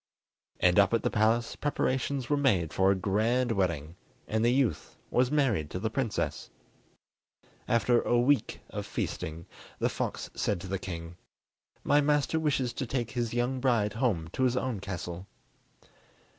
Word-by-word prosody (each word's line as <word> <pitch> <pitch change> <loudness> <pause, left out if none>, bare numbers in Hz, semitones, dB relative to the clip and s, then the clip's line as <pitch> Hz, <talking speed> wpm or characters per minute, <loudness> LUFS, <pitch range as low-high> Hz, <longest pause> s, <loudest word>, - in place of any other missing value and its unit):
And 90 +2 +4
up 100 +3 +4
at 115 - -1
the - - +1
palace 115 +2 +2
preparations 135 -2 -1
were 145 - +2
made 100 - +2
for 95 0 +3
a 100 - +4
grand 110 +6 +1
wedding, 85 -5 -1 0.3
and 110 +1 0
the 120 - +4
youth 125 - 0
was 125 0 +3
married 125 - +1
to 90 - -4
the 110 +3 -2
princess. 115 -4 -2 1.2
After 120 +1 +3
a 120 - +2
week 135 +3 +1
of - - -5
feasting, 80 +2 -4 0.3
the - - +1
fox - - -4
said 100 - -1
to 95 - -7
the 95 0 -2
king: 85 -2 -7 0.7
"My 145 - +4
master 150 +2 +2
wishes 135 -6 0
to 130 - -4
take 120 -2 -2
his 120 -2 -2
young 125 +2 0
bride 120 -5 +2
home 105 -9 0
to 110 - -5
his 130 -1 +2
own 125 -5 -1
castle." 90 -1 -6
115 Hz, 160 wpm, -29 LUFS, 95-130 Hz, 1.2 s, And